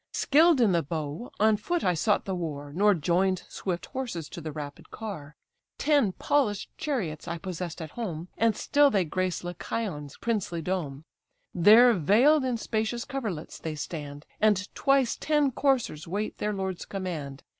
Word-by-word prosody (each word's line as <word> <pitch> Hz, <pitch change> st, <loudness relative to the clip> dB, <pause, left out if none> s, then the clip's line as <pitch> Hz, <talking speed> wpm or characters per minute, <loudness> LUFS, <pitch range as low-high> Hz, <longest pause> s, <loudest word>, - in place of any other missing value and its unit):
Skill'd 315 Hz, +1 st, +4 dB
in 225 Hz, -5 st, +4 dB
the 170 Hz, -2 st, +3 dB
bow, 155 Hz, -, -5 dB
on 215 Hz, 0 st, +4 dB
foot 345 Hz, +11 st, -2 dB
I 180 Hz, -, +3 dB
sought 205 Hz, +5 st, +1 dB
the 195 Hz, -, -2 dB
war, 145 Hz, -5 st, -5 dB
Nor 205 Hz, +4 st, +4 dB
join'd 180 Hz, +3 st, +1 dB
swift 180 Hz, -3 st, -4 dB
horses 225 Hz, -, -5 dB
to 170 Hz, -, -8 dB
the 155 Hz, 0 st, -5 dB
rapid 145 Hz, -1 st, -8 dB
car. 155 Hz, -10 st, -7 dB, 0.4 s
Ten 285 Hz, -9 st, +3 dB
polish'd 225 Hz, -7 st, 0 dB
chariots 190 Hz, -, -3 dB
I 170 Hz, 0 st, -3 dB
possess'd 175 Hz, -1 st, -5 dB
at 155 Hz, -, -9 dB
home, 180 Hz, -8 st, -5 dB
And 225 Hz, -1 st, +2 dB
still 290 Hz, 0 st, +4 dB
they 195 Hz, -8 st, +1 dB
grace 185 Hz, +3 st, -2 dB
Lycaon's 175 Hz, -4 st, -4 dB
princely 195 Hz, -7 st, -2 dB
dome: 155 Hz, -6 st, -3 dB, 0.5 s
There 220 Hz, +7 st, +7 dB
veil'd 235 Hz, -, +4 dB
in 250 Hz, -2 st, 0 dB
spacious 220 Hz, +2 st, -2 dB
coverlets 220 Hz, -, -5 dB
they 160 Hz, -1 st, -4 dB
stand; 145 Hz, -1 st, -6 dB
And 205 Hz, -2 st, +2 dB
twice 275 Hz, -3 st, +2 dB
ten 295 Hz, -3 st, +2 dB
coursers 255 Hz, -, 0 dB
wait 205 Hz, +5 st, -3 dB
their 210 Hz, -, 0 dB
lord's 190 Hz, -3 st, -3 dB
command. 160 Hz, -8 st, -5 dB
190 Hz, 160 wpm, -27 LUFS, 160-235 Hz, 0.5 s, There